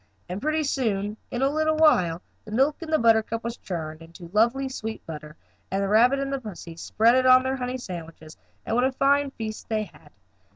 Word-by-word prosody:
And 185 +3 -5
pretty 310 +1 0
soon, 215 -7 -1
in 245 +2 -2
a 270 - +4
little 310 +1 +1
while, 180 - +3 0.2
the - - -12
milk 270 +9 +1
in 330 - -7
the 315 - +3
buttercup 225 -1 +2
was 235 0 -4
churned 160 -3 -6
into 170 +1 -12
lovely 240 +6 +2
sweet 225 -4 -6
butter, 150 -1 -8 0.3
and 195 +1 -1
the - - 0
rabbit 235 +6 +4
and 275 -1 -2
pussy 180 -7 -9
spread 220 +7 +2
it 255 0 +3
on 255 0 +7
their 260 +1 -1
honey 250 0 -3
sandwiches, 165 -7 -9 0.3
and 225 - -1
what 245 - +3
a 260 - +2
fine 280 +1 +2
feast 220 -5 -7
they 215 -1 0
had. 160 -7 -15
230 Hz, 205 wpm, -25 LUFS, 190-270 Hz, 0.3 s, on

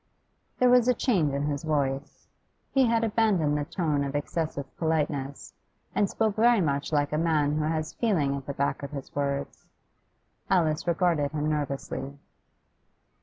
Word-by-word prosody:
There 250 -1 +4
was 250 -1 +5
a 250 - +4
change 180 - +1
in 140 +1 -1
his 145 -1 -2
voice. 145 -2 -2 0.4
He 265 -2 +4
had 230 0 +2
abandoned 205 -9 +2
the 145 -1 -1
tone 150 -4 -1
of 140 0 -4
excessive 145 -1 -2
politeness, 150 -4 -2 0.4
and 200 - +2
spoke 220 -2 0
very 235 +1 +5
much 145 -4 -1
like 145 -1 +1
a 150 - +1
man 150 -3 +2
who 150 - 0
has 155 0 -2
feeling 160 - +1
at 140 -1 -7
the 140 - -3
back 140 - -1
of 140 - -5
his 140 -3 -8
words. 140 -1 -3 0.8
Alice 165 -3 +1
regarded 165 -4 +1
him 150 0 -1
nervously. 140 -2 -3
150 Hz, 160 wpm, -27 LUFS, 140-180 Hz, 0.8 s, was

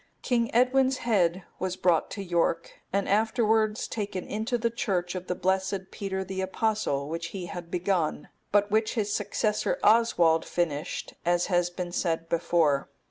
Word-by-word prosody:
King 235 -3 +1
Edwin's 255 +2 +3
head 185 -5 +2 0.2
was 185 0 -2
brought 175 -4 +2
to 200 - -5
York, 170 -2 -1
and 200 +1 0
afterwards 220 0 +2
taken 200 -4 -4
into 220 +4 -2
the 235 0 0
church 185 -6 -1
of 185 -1 -6
the 180 - -1
blessed 190 +1 -1
Peter 190 -1 -3
the 190 0 -4
Apostle, 190 -8 -1
which 165 +2 -4
he 185 0 -6
had 175 -1 -7
begun, 175 -4 -1 0.2
but 205 0 +3
which 215 +2 +1
his 210 -2 0
successor 210 +1 0
Oswald 180 -8 +4
finished, 160 -2 -2
as 175 0 +2
has 175 0 +3
been 175 0 -5
said 165 -2 -1
before. 165 -4 +2
190 Hz, 155 wpm, -27 LUFS, 175-215 Hz, 0.2 s, Oswald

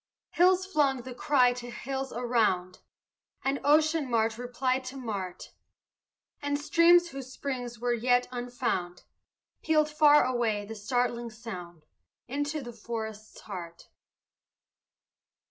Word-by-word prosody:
Hills 365 +1 +4
flung 280 -8 +1
the 255 0 -7
cry 250 -1 +3
to 245 0 -8
hills 265 +2 -4
around, 225 -7 0 0.6
And 270 +1 0
ocean 305 0 +3
mart 225 -1 +1
replied 255 +1 -1
to 260 +2 -7
mart, 200 -8 -5 0.9
And 285 0 -1
streams, 340 +3 +5
whose 270 -3 -8
springs 250 -3 -5
were 240 +2 0
yet 245 +1 +2
unfound, 245 -8 -3 0.6
Pealed 305 -1 +2
far 295 -1 +6
away 230 -5 0
the 220 - -7
startling 240 +2 -1
sound 180 -8 -9 0.4
Into 290 +4 -2
the 240 -1 -8
forest's 220 -1 -7
heart. 170 -4 -9
245 Hz, 115 wpm, -29 LUFS, 225-280 Hz, 0.9 s, far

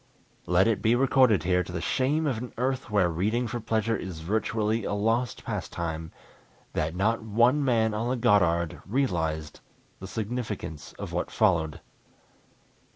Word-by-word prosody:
Let 90 +3 +4
it 115 -3 +1
be 115 +2 +3
recorded 130 - +4
here, 90 0 +2
to 90 - -9
the 90 - -3
shame 135 - +1
of 130 -7 0
an 125 +1 -7
Earth 130 +2 -1
where 100 -4 +3
reading 105 +9 0
for 120 +1 -3
pleasure 115 0 0
is 90 -6 -6
virtually 110 +4 0
a - - -2
lost 115 +4 0
pastime, 80 -1 -4 0.6
that 80 +2 -1
not 110 +5 +1
one 120 +6 +3
man 115 -4 +2
on 115 +3 -1
the 130 - +1
Goddard 85 -8 +2
realized 80 - -1 0.4
the 95 - -7
significance 105 -8 -5
of - - -7
what - - -1
followed. 80 -2 +1
110 Hz, 155 wpm, -27 LUFS, 90-120 Hz, 0.6 s, Let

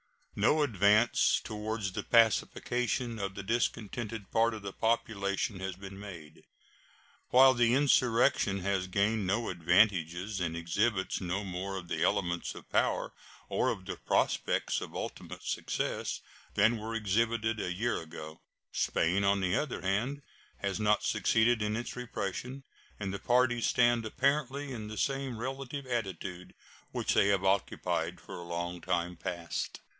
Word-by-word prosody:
No 155 0 +3
advance 105 -2 +4
toward 110 0 -4
the 95 -1 -2
pacification 120 +1 +2
of 100 -1 -3
the 100 - -5
discontented 110 -1 -2
part 115 0 +3
of 105 - -9
the 100 -1 -5
population 105 -3 0
has 95 -1 -4
been 95 +1 -9
made. 85 -7 -10 0.8
While 130 +1 +7
the 120 -1 +3
insurrection 125 -6 +3
has 95 0 0
gained 100 +2 +1
no 110 +5 0
advantages 90 +2 +2
and 85 -2 -1
exhibits 95 +5 0
no 95 +3 -2
more 95 +1 -4
of 90 -2 -7
the - - -2
elements 85 0 0
of - - -12
power - - +1 0.4
or - - +1
of 95 - -4
the - - -5
prospects - - 0
of - - -7
ultimate - - -6
success - - -2 0.3
than 110 +3 +4
were 110 +1 -4
exhibited 110 +1 +1
a 90 - -2
year 115 +6 -1
ago, 80 -1 -9 0.3
Spain, 90 +5 +1
on 100 0 +3
the 90 0 +1
other 150 -10 -2
hand, 115 +10 -1 0.4
has 100 +1 -2
not 105 -1 +2
succeeded 115 0 +3
in 105 0 0
its 120 +2 -4
repression, 125 +2 -4 0.4
and 100 -2 -3
the 100 - -4
parties 120 -1 +2
stand 120 -1 +3
apparently 140 +3 0
in 110 -4 -5
the 110 0 -7
same 135 +1 -1
relative 135 +3 -5
attitude 95 -7 -4 0.4
which - - 0
they - - +4
have 100 -1 +2
occupied 95 0 0
for - - -9
a - - -7
long 85 +1 -3
time 85 +2 -1
past. 85 0 -4
105 Hz, 150 wpm, -31 LUFS, 95-120 Hz, 0.8 s, While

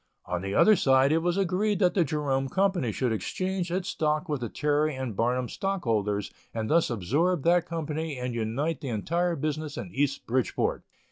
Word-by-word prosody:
On 90 0 -2
the 95 +1 -3
other 215 - +6
side 135 -5 +4
it 160 - +3
was 175 +2 0
agreed 195 +2 +1
that 180 -2 +3
the 180 - +3
Jerome 135 -3 -1
Company 190 - +1
should 125 +2 -1
exchange 185 - -2
its 185 +1 -1
stock 155 +2 0
with 145 -5 -2
the 120 - -3
Terry 150 -1 0
& - - -8
Barnum 125 +4 0
stockholders 110 - -1 0.2
and 110 -1 -2
thus 165 -1 +4
absorb 140 - 0
that 175 0 +3
company 160 -2 -3
and 125 -1 -3
unite 120 +9 -2
the 140 - -4
entire 170 - 0
business 155 0 -3
in 180 - -6
East 140 0 0
Bridgeport. 125 +1 0
150 Hz, 185 wpm, -27 LUFS, 125-175 Hz, 0.2 s, other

